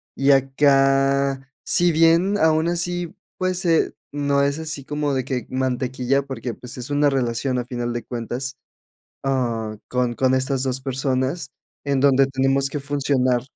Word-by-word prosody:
Y 135 +1 +3
acá, 135 0 +2
si 175 0 +3
bien, 165 +5 +4
aún 160 0 +3
así, 175 0 -2 0.2
pues, 185 0 -1
eh, 165 -2 +2 0.2
no 140 -1 +1
es 140 +2 0
así 155 -4 -5
como 150 -1 -1
de 130 -2 -1
que 130 -2 -3
mantequilla, 130 +1 0
porque 130 -3 -5
pues, 125 +2 -10
es 125 +2 -6
una 145 0 +3
relación, 125 0 -1
a 120 - -3
final 120 -2 -3
de 120 - -4
cuentas. 125 +3 -4 0.7
Ah, 120 -5 -1
con 125 -1 0
con 130 +2 +1
estas 130 0 0
dos 130 -1 -1
personas, 135 +2 -2 0.3
en 140 -2 0
donde 135 -1 +5
tenemos 135 +1 +1
que 145 - -4
funcionar 135 -3 +1
135 Hz, 155 wpm, -22 LUFS, 130-145 Hz, 0.7 s, donde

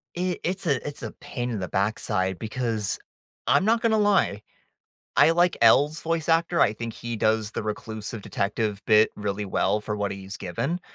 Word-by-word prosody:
I 180 +1 -1
it's 190 +2 -2
a 140 -6 0
it's 145 - -7
a - - -4
pain 125 -1 -5
in 110 -4 -3
the 90 - -3
backside 95 -1 0
because 110 -3 -2 0.5
I'm 145 +9 +4
not 225 +1 +3
gonna 220 -2 +3
lie, 200 - +2 0.8
I - - +7
like 175 +1 +3
L's 145 +7 +5
voice 165 -1 -2
actor, 165 +1 +2
I 105 - +5
think 115 +1 -5
he 120 -1 -5
does 110 0 +1
the - - -3
reclusive 110 0 -5
detective 105 0 -2
bit 110 -1 +5
really 105 0 -3
well 105 +2 +1
for 105 0 -4
what 100 -1 -1
he's 100 +1 -7
given. 140 - -3
110 Hz, 180 wpm, -25 LUFS, 105-165 Hz, 0.8 s, I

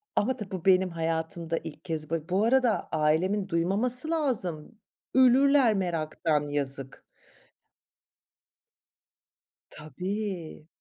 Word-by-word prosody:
ama 255 +5 +1
tabii 210 -5 -8
bu 185 -2 -6
benim 185 -1 +4
hayatımda 165 0 -3
ilk 160 -1 -9
kez 155 -3 -4
ba 165 +1 -3
bu 195 +4 +1
arada 250 -2 +2
ailemin 180 +6 +1
duymaması 225 - +1
lazım. 230 - -1 0.4
Ölürler 260 -1 +5
meraktan, 160 -4 -1
yazık. 135 -2 -3 2.7
Tabii. 180 +1 -6
180 Hz, 95 wpm, -27 LUFS, 160-220 Hz, 2.7 s, Ölürler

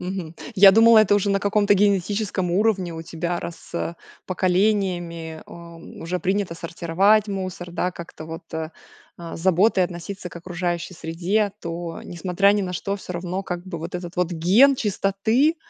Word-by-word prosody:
Мгм. 180 -3 -5 0.2
Я 195 0 +9
думала 225 +1 +7
это 205 -1 +5
уже 205 0 +1
на 195 0 +1
каком-то 205 0 +3
генетическом 200 -1 +1
уровне 195 -3 +1
у 160 - -6
тебя, 170 +1 -3
раз, 170 - -9
э, 170 0 -2 0.3
поколениями, 180 -4 0
а, 170 -1 -11
уже 165 +2 -6
принято 190 -2 -1
сортировать 175 +6 +2
мусор, 185 -2 -5
да, 180 +1 -1
как-то 170 -2 -10
вот, 165 +1 -7
а, 160 0 -3 0.5
а, 170 -1 -8
с - - -9
заботой 190 +2 +3
относиться 180 +2 -7
к - - -12
окружающей 175 0 -3
среде, 180 +6 -1
то, 170 0 -5
несмотря 180 +3 +1
ни 205 -1 +1
на 180 -1 -4
что, 200 +3 -2
всё 185 - -8
равно, 180 +2 -3
как 175 -1 -5
бы, 170 -3 -5
вот 170 +3 -7
этот 175 -1 -8
вот 180 -1 +1
ген 195 +12 +5
чистоты- 220 - +1
180 Hz, 170 wpm, -23 LUFS, 170-200 Hz, 0.5 s, Я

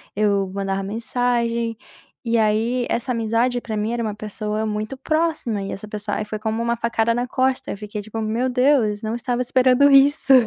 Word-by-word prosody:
eu 200 -2 +2
mandava 195 0 -2
mensagem, 235 +1 -1 0.5
e 230 0 +2
aí 225 +3 +1
essa 240 +2 -1
amizade 230 +2 0
pra 220 -2 -4
mim 215 +3 -1
era 240 - -1
uma 215 -2 -3
pessoa 215 0 -3
muito 215 +4 -3
próxima 310 -7 -1
e 195 - -5
essa 210 +2 -7
pessoa 210 0 -4
aí 210 - -3
foi 215 0 -5
como 220 +1 -2
uma 235 0 0
facada 230 0 +1
na 245 +1 -1
costa, 260 +1 0
eu - - -5
fiquei 210 0 -6
tipo: 215 +2 -6
"Meu 225 +4 0
Deus, 250 -5 +2
não 220 +1 -2
estava 240 +1 -2
esperando 255 +3 +4
isso". 275 0 +5
230 Hz, 190 wpm, -22 LUFS, 215-245 Hz, 0.5 s, isso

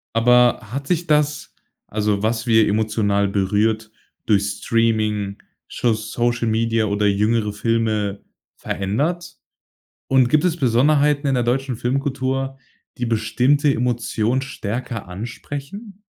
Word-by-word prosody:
Aber 125 +1 +4
hat 140 +1 -4
sich 175 -1 0
das 150 -1 0 0.4
also, 105 -1 0
was 110 0 -1
wir 110 -1 +4
emotional 105 -1 +1
berührt 105 +3 0 0.3
durch 100 -2 +3 0.2
Streaming, 110 -3 0 0.3
scho 120 -2 0
Social 115 +2 -1
Media 115 0 +1
oder 105 0 +1
jüngere 105 +1 +1
Filme 110 -2 -1 0.4
verändert? 150 - -2 0.7
Und 130 -2 +4
gibt 150 +3 +3
es 170 -1 +1
Besonderheiten 145 +2 +2
in 135 - +2
der 125 - +1
deutschen 130 +2 -1
Filmkultur, 135 +1 -2 0.4
die 120 - -2
bestimmte 125 +6 +2
Emotion 120 0 0
stärker 120 -3 -5
ansprechen? 140 - -8
115 Hz, 115 wpm, -21 LUFS, 110-135 Hz, 0.7 s, Aber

